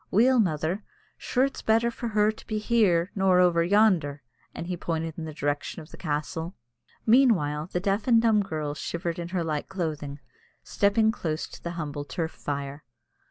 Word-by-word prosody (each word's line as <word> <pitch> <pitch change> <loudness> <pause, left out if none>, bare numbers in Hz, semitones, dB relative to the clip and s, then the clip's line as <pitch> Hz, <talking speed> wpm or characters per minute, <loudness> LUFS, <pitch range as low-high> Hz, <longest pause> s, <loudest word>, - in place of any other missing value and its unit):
"Weel, 250 +5 +4
mother, 175 +1 0 0.3
sure 255 - 0
it's 275 - -5
better 225 +2 +2
for 235 - -5
her 210 -1 +3
to 220 - -15
be 215 - -2
here 205 -6 +2
nor 190 -2 +3
over 175 -2 +4
yonder," 175 - +3 0.3
and - - -6
he 180 +1 -3
pointed 165 -2 -3
in 165 - -5
the 155 - -5
direction 145 +3 -2
of 155 0 -12
the - - -9
castle. 160 +2 -3 0.5
Meanwhile, 190 - +3
the 180 - 0
deaf 200 +4 -1
and 235 -2 +6
dumb 225 -2 +4
girl 155 -6 -3
shivered 170 +2 -4
in 170 - -4
her 180 -1 -2
light 155 -2 -3
clothing, 155 -6 -4 0.4
stepping 215 +2 +2
close 160 -8 -3
to - - -12
the 170 - -5
humble 145 -3 -4
turf 160 +4 -3
fire. 140 0 -5
175 Hz, 180 wpm, -27 LUFS, 155-210 Hz, 0.5 s, and